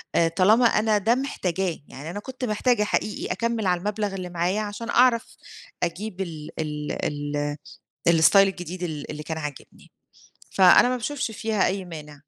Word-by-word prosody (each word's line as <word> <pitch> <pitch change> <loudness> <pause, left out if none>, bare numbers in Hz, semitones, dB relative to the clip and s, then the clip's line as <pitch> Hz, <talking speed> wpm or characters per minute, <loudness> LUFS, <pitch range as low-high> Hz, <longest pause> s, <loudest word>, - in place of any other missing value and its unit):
آآ، 165 - +4
طالما 205 +8 +4
أنا 215 -1 +3
ده 225 +4 +2
محتاجاه، 190 - -2
يعني 145 +5 -9
أنا 205 - -5
كنت 255 +3 -6
محتاجة 215 +1 +1
حقيقي 210 0 -2
أكمِّل 230 -3 -1
على 180 -1 +2
المبلغ 205 +1 -2
اللي 180 -1 -5
معايا 175 +4 0
عشان 210 +3 -5
أعرف 240 -2 +4 0.6
أجيب 190 +3 -3
ال 160 -4 -6
ال 150 -1 -3 1.2
ال 165 -1 +5
الStyle 200 - +6
الجديد 185 -2 +2
ال 155 -5 -4
اللي 150 - -6
كان 160 +1 -4
عاجبني. 150 -3 -9 0.6
فأنا 190 +6 +6
ما 255 - 0
باشوفش 250 -1 -3
فيها 220 -2 0
أي 190 0 -2
مانع. 155 -4 -9
195 Hz, 160 wpm, -24 LUFS, 170-220 Hz, 1.2 s, الStyle